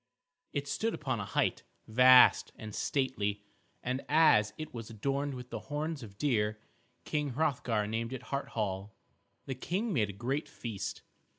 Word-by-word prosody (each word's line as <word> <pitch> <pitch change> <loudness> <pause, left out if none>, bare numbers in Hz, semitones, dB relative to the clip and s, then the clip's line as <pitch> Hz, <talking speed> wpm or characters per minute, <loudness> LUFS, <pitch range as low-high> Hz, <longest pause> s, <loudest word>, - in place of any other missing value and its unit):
It 140 0 -3
stood 215 +11 -1
upon 130 -6 -2
a 105 - -3
height, 95 - 0 0.3
vast 125 +3 +7
and 110 -2 -8
stately, 105 -8 -1 0.4
and 130 +2 -2
as 145 -9 +5
it 155 - -6
was 115 -2 -6
adorned 140 +5 -2
with 125 0 -9
the - - -3
horns 150 0 -2
of 100 -4 -11
deer, 105 -6 +1 0.5
King 150 -3 -1
Hrothgar 125 -7 +1
named 115 +2 -2
it 130 -1 -5
Hart 140 0 -1
Hall. 100 -1 -2 0.5
The 135 - -3
King 190 - -2
made 105 -8 +2
a - - -5
great 130 +8 -2
feast. 110 -5 -5
125 Hz, 160 wpm, -32 LUFS, 105-145 Hz, 0.5 s, vast